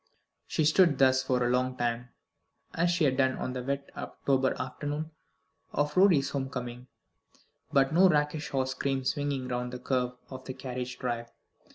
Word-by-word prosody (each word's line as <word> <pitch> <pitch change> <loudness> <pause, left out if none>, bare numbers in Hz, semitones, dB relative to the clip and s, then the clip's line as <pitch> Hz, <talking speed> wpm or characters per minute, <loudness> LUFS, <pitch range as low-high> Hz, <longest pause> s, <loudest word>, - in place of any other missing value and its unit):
She 155 - +1
stood 165 -2 +5
thus 130 -1 +5
for 130 -1 +1
a - - +1
long 125 +1 0
time, 120 0 -1 0.6
as 170 +1 +2
she 175 -1 +1
had 130 -3 +2
done 130 -1 +2
on 125 - -3
that 125 0 -5
wet 140 0 -3
October 135 -1 0
afternoon 145 +4 -4 0.6
of 145 +1 0
Rorie's 180 -7 +5
home 135 -2 -2
coming; 125 -1 -6 0.8
but 135 +1 +3
no 185 +3 +6
rakish 150 -1 0
horse 130 -1 -1
came 135 0 -1
swinging 135 0 -1
round 125 0 -2
the - - -3
curve 125 0 -1 0.2
of 130 - -7
the 130 - -6
carriage 125 -1 -5
drive. 120 -1 -3
130 Hz, 170 wpm, -29 LUFS, 125-145 Hz, 0.8 s, no